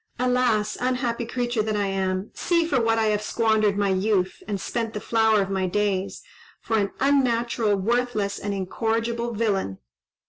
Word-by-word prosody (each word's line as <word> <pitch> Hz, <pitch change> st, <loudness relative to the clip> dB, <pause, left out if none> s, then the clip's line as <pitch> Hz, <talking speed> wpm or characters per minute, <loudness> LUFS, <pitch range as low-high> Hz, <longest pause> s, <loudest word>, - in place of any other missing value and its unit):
Alas! 250 Hz, -4 st, +1 dB
unhappy 250 Hz, -2 st, -1 dB
creature 240 Hz, -2 st, -1 dB
that 215 Hz, 0 st, -1 dB
I 205 Hz, -1 st, +1 dB
am! 190 Hz, 0 st, -2 dB
see 340 Hz, -2 st, +1 dB
for 280 Hz, -6 st, +1 dB
what 225 Hz, 0 st, +2 dB
I 225 Hz, -, +2 dB
have 210 Hz, -, -1 dB
squandered 215 Hz, -2 st, +1 dB
my 200 Hz, -1 st, +1 dB
youth, 190 Hz, -1 st, 0 dB
and 205 Hz, -2 st, -2 dB
spent 225 Hz, +4 st, -3 dB
the -, -, -2 dB
flower 220 Hz, -1 st, +3 dB
of 195 Hz, -, -6 dB
my 190 Hz, -1 st, 0 dB
days! 200 Hz, -, -1 dB, 0.4 s
For 225 Hz, -, -2 dB
an 200 Hz, -1 st, 0 dB
unnatural, 240 Hz, -5 st, +2 dB
worthless, 215 Hz, -1 st, -1 dB
and 205 Hz, -, -3 dB
incorrigible 230 Hz, +4 st, -2 dB
villain!" 200 Hz, -, -1 dB
220 Hz, 165 wpm, -24 LUFS, 200-235 Hz, 0.4 s, flower